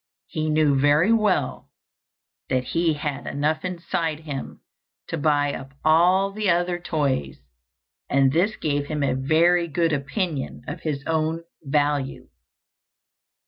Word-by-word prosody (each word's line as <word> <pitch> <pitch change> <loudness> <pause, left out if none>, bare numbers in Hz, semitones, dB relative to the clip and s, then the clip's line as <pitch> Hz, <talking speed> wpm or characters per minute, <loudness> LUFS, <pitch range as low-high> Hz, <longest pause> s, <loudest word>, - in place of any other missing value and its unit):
He 155 0 -3
knew 155 -2 +3
very 150 +9 +4
well 200 - 0 0.8
that 130 -1 +1
he 165 +3 0
had 145 -2 -4
enough 150 +2 -1
inside 170 -3 -2
him 145 -4 -6 0.5
to - - -2
buy 145 -2 +1
up 135 0 -8
all 180 +5 +4
the 210 0 -1
other 175 0 +1
toys, 140 - -1 0.7
and 135 -1 +3
this 185 +8 +1
gave 145 -2 -1
him 150 -1 -2
a 140 - +1
very 165 +6 +3
good 165 +1 0
opinion 145 +1 -3
of - - -5
his 145 -3 -3
own 160 +1 -1 0.2
value. 145 -2 -1
155 Hz, 130 wpm, -24 LUFS, 145-170 Hz, 0.8 s, very